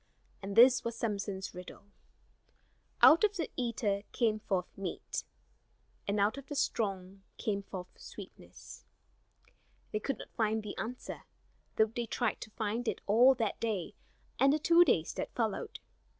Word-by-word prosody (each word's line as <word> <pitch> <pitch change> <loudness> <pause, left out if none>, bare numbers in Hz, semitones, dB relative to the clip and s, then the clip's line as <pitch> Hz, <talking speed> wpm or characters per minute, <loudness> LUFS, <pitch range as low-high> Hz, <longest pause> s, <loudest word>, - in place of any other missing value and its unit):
And 195 0 -5
this 245 +2 +7
was 235 0 -3
Samson's 200 -4 -3
riddle: 180 +2 -10 1.2
"Out 330 +4 +8
of 420 -1 +3
the 330 - -3
eater 230 -5 -1
came 220 -3 +1
forth 190 -4 -2
meat, 195 -3 -4 0.8
And 200 +1 0
out 210 +7 +2
of 275 - -13
the 290 - -5
strong 195 -7 -2 0.2
came 200 -2 -1
forth 185 -2 -9
sweetness." - - -11 1.1
They 215 - -1
could 275 +5 -2
not - - -11
find 220 -1 0
the 210 - -6
answer, 245 +2 -6 0.5
though 220 - +5
they 235 -1 -2
tried - - -1
to - - -7
find 220 +3 -3
it - - -1
all 245 +6 +6
that 225 -4 -2
day 210 -7 -2 0.5
and 275 +1 +6
the 300 - +3
two 335 +3 +6
days 170 - +1
that - - -5
followed. 220 -4 -2
220 Hz, 150 wpm, -32 LUFS, 200-245 Hz, 1.2 s, Out